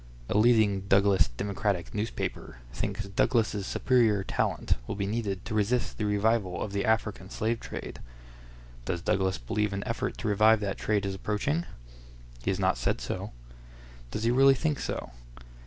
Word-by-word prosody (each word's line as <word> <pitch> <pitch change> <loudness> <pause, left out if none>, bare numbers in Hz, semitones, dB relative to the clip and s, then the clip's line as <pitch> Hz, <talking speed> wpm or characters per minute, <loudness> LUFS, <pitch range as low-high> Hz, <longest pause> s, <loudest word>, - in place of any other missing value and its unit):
A - - -1
leading 105 -3 +4
Douglas 100 0 +4
Democratic 100 - -2
newspaper 105 - -4 0.2
thinks 100 - -3
Douglas's 105 0 +1
superior 115 -6 +2
talent - - 0
will - - -3
be 100 -1 -2
needed 100 -3 -2
to 115 - -4
resist 110 +4 0
the 105 - 0
revival 105 -2 +1
of 105 - -3
the 100 -1 0
African 105 -4 0
slave 115 +1 -1
trade. - - -7 0.9
Does 85 +5 -2
Douglas 95 0 +1
believe 100 - -1
an 100 0 -3
effort 125 +1 -2
to - - -4
revive 110 +2 +5
that 100 -1 -3
trade 105 -2 0
is 100 - -2
approaching? 105 - -1 0.8
He - - -1
has 95 - +1
not 95 -1 +1
said - - 0
so. - - -4 0.8
Does 105 - -4
he 115 - +3
really 135 +2 +6
think 150 +2 -1
so? - - -4
105 Hz, 160 wpm, -28 LUFS, 100-115 Hz, 0.9 s, really